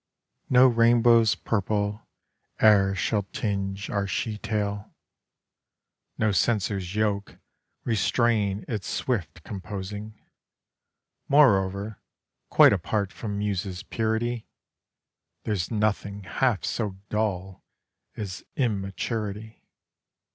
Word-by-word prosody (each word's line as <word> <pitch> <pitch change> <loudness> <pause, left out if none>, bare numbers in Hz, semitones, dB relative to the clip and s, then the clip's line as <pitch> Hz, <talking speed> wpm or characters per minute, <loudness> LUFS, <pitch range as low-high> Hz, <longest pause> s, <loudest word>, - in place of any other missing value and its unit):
No 125 0 +7
rainbow's 115 -2 +5
purple 105 0 -2 0.5
e'er 100 -2 +5
shall 105 +3 0
tinge 100 -1 -2
our 100 -1 0
she 105 +3 -2
tale, 105 -2 -3 1.2
No 110 -1 +2
censor's 100 -3 0
yoke 105 -2 -1 0.5
restrain 110 -2 +1
its 105 -5 -4
swift 95 -9 -2
composing. 105 +2 -7 1.1
Moreover 100 -7 +3 0.5
quite - - +7
apart 100 -3 -1
from 105 -3 -5
Muse's 100 -2 -2
purity 110 +1 -2 1.0
There's 100 -6 -1
nothing 105 -2 -1
half 110 +3 0
so 105 -5 -2
dull 95 -3 -2 0.5
as 100 -4 -5
immaturity. 110 -1 -3
105 Hz, 85 wpm, -26 LUFS, 100-110 Hz, 1.2 s, No